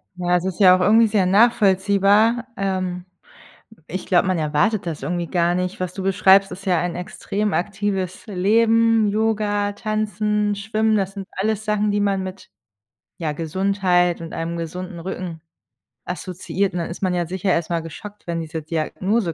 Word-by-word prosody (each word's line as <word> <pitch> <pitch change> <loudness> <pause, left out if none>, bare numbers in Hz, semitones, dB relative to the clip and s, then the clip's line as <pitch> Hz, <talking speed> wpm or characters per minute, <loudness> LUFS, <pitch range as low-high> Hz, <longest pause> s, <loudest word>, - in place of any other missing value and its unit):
Ja, 180 0 0
es 175 - +1
ist 190 0 -4
ja 185 -2 +8
auch 185 - -1
irgendwie 225 +4 +5
sehr 205 -3 +2
nachvollziehbar. 205 +2 +3
Ähm, 185 -2 -2 0.7
w 220 - -19
ich 185 +3 -5
glaube, 180 0 +3
man 185 -2 +1
erwartet 160 +7 +1
das 160 -3 -4
irgendwie 175 -2 -2
gar 175 -1 +1
nicht. 180 +1 -3
Was 180 -1 -3
du 190 - -5
beschreibst, 195 0 +4
ist 190 +2 -9
ja 180 -3 +2
ein 175 -1 -2
extrem 200 +3 -3
aktives 195 -1 -2
Leben. 225 +3 +3
Yoga, 210 -1 0
Tanzen, 210 -1 -1
Schwimmen, 215 +2 0
das 195 -1 -1
sind 195 -2 -7
alles 215 +2 -2
Sachen, 210 -1 +1
die 205 - 0
man 195 -1 +1
mit, 185 +1 -8 0.7
ja, 155 -3 -2
Gesundheit 180 +1 +1
und 165 - -7
einem 165 +1 -3
gesunden 170 +2 -6
Rücken 175 -2 -6 0.7
assoziiert. 185 +1 -3
Und, 175 - -2
dann 170 - -3
ist 170 - -8
man 185 -1 +1
ja 175 -1 0
sicher 185 +1 -1
erstmal 170 0 0
geschockt, 205 +6 -10
wenn 170 -1 -2
diese 160 0 -5
Diagnose 170 +5 -1
190 Hz, 170 wpm, -21 LUFS, 175-210 Hz, 0.7 s, ja